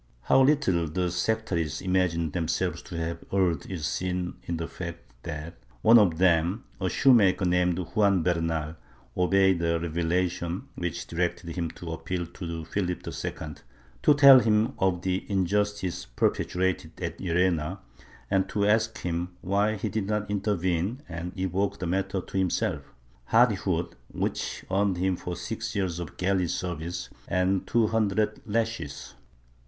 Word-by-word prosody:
How 135 - +5
little 130 - +3
the 90 +3 -1
sectaries 90 -5 -1
imagined 90 -4 0
themselves 85 -3 -1
to 85 - -8
have 85 0 -3
erred 90 -6 +1
is 85 -6 -4
seen 90 +2 -2
in 85 - -1
the 80 0 -3
fact 85 -1 -6 0.2
that 80 +2 -7 0.2
one 115 +1 +8
of 90 -6 +3
them, 90 +4 +2 0.2
a 95 -2 0
shoemaker 105 -8 +4
named 90 -1 +2
Juan 100 0 +2
Bernal, 80 -2 -1 0.4
obeyed 95 0 +3
a 85 0 +1
revelation 85 +1 -1
which 85 -2 -4
directed 85 0 -2
him 85 -2 -2
to 85 -2 -6
appeal 85 +2 -3
to 85 -1 -6
Philip 90 +1 -2
II, - - -3 0.7
to 150 - +6
tell 140 -2 +9
him 110 +2 +2
of 95 -2 +1
the 95 0 0
injustice 100 -2 0
perpetrated 90 +6 -1
at 85 -2 -4
Llerena 90 -1 +1 0.5
and 95 0 +2
to 100 0 0
ask 110 0 +2
him 90 +1 -3
why 100 +3 +1
he 100 - -3
did 105 -3 -2
not 105 -1 -1
intervene 100 - -1
and 85 +1 -5
evoke 95 +2 0
the 90 - -4
matter 95 +2 -1
to 95 - -6
himself 95 -2 0 0.3
— - - -32
hardihood 95 - +2 0.2
which - - -3
earned 95 -1 +2 0.2
for 90 - -5
him - - -4
six 110 +7 -5
years 95 -4 -1
of 85 -3 -7
galley 95 -1 +1
service 90 -1 -4 0.2
and 90 +1 +1
two 115 -1 +3
hundred 110 -1 0
lashes. 105 -10 -2
90 Hz, 150 wpm, -27 LUFS, 85-100 Hz, 0.7 s, tell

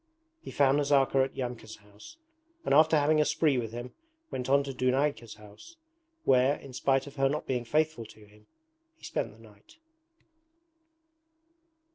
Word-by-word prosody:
He - - -10
found 140 0 +2
Nazarka 140 -2 +2
at 135 - -10
Yamka's 120 -3 -6
house, 105 - -16 0.5
and - - +1
after 155 +2 +5
having 150 +1 +3
a - - +4
spree 150 -3 +1
with 115 -2 -5
him 120 +2 -8 0.4
went 125 -1 -4
to 140 0 +1
Dunayka's 130 -2 -1
house, 105 - -15 0.5
where, 130 +2 +3
in 135 -3 -12
spite 135 +1 +1
of 140 0 -12
her 135 0 +2
not 150 +2 -3
being 125 -2 -2
faithful 155 -2 0
to 110 0 -17
him, 105 +1 -22 0.5
he - - -30
spent 115 - -3
the 105 - -19
night. 110 - -19
130 Hz, 155 wpm, -29 LUFS, 115-145 Hz, 0.5 s, after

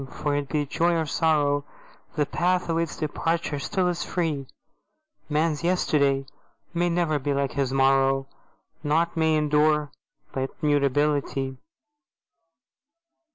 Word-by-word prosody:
For, 145 -1 -1
be 145 +1 -1
it 145 - -12
joy 170 +1 +2
or 165 -1 0
sorrow, 145 -2 +1 0.5
The 150 -2 +2
path 180 +3 0
of 165 0 +1
its 165 -3 -2
departure 160 0 -1
still 180 +6 0
is 175 -1 -1
free: 155 -6 -2 0.8
Man's 155 +1 0
yesterday 140 -6 +2 0.5
may 175 0 +1
ne'er 170 -3 +1
be 140 +1 -1
like 140 -1 0
his 140 -3 -1
morrow; 135 0 +3 0.6
Nought 160 +3 +1
may 160 -1 +2
endure 150 0 +2 0.4
but 135 0 -2
Mutability. 145 -2 +1
150 Hz, 120 wpm, -25 LUFS, 140-165 Hz, 0.8 s, morrow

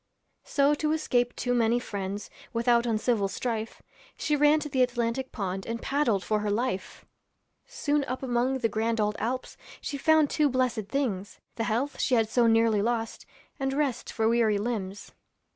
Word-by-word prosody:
So 280 0 +3
to 305 +1 0
escape 245 -6 0
too 245 - -1
many 235 -1 +3
friends, 200 -2 -5 0.2
Without 235 0 +2
uncivil 220 -2 +1
strife, 225 +1 -4 0.3
She 300 - 0
ran 295 +1 +5
to 300 - -4
the 265 -3 0
Atlantic 245 +1 0
pond 190 -3 -4
And 230 0 -3
paddled 240 -10 +1
for 215 +3 0
her 210 0 -2
life. 210 -2 -2 0.6
Soon 295 -1 0
up 255 +1 -4
among 250 +1 +1
the 230 - +3
grand 225 +1 -1
old 210 0 +1
Alps 255 +3 -3 0.2
She 280 - -5
found 315 0 +4
two 300 -2 +3
blessed 250 -5 0
things: 205 -8 -2
The 225 - -2
health 245 +5 -1
she 255 - +2
had 225 -2 +3
so 235 0 +3
nearly 225 -2 +4
lost, 230 +1 -2 0.3
And 270 0 -1
rest 280 -3 -1
for 220 -1 +1
weary 225 -2 +3
limbs. 205 -3 -4
235 Hz, 170 wpm, -28 LUFS, 220-265 Hz, 0.6 s, ran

